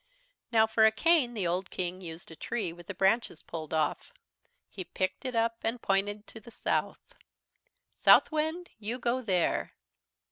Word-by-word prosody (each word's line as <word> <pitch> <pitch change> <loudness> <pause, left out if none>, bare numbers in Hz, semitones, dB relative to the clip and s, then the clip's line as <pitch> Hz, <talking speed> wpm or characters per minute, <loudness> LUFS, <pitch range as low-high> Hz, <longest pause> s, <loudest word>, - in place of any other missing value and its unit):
"Now 220 -2 +5
for 220 0 +2
a - - +4
cane 265 0 +3
the 200 -4 -1
old 180 +2 -1
King 185 0 -3
used 165 -1 -8
a - - -9
tree 200 -2 -3
with 175 0 -14
the 200 - -6
branches 195 -2 +1
pulled 160 -2 -7
off. 160 - -1 0.6
He 190 - -7
picked 185 +5 -3
it 255 -2 -3
up 230 0 +1
and 230 +2 -1
pointed 205 +1 0
to 220 - -11
the 235 - -14
south. - - -2 0.9
"'Southwind, 315 +3 +4
you 225 +3 -3
go 245 +1 0
there.' 185 -7 0
215 Hz, 165 wpm, -30 LUFS, 185-235 Hz, 0.9 s, Now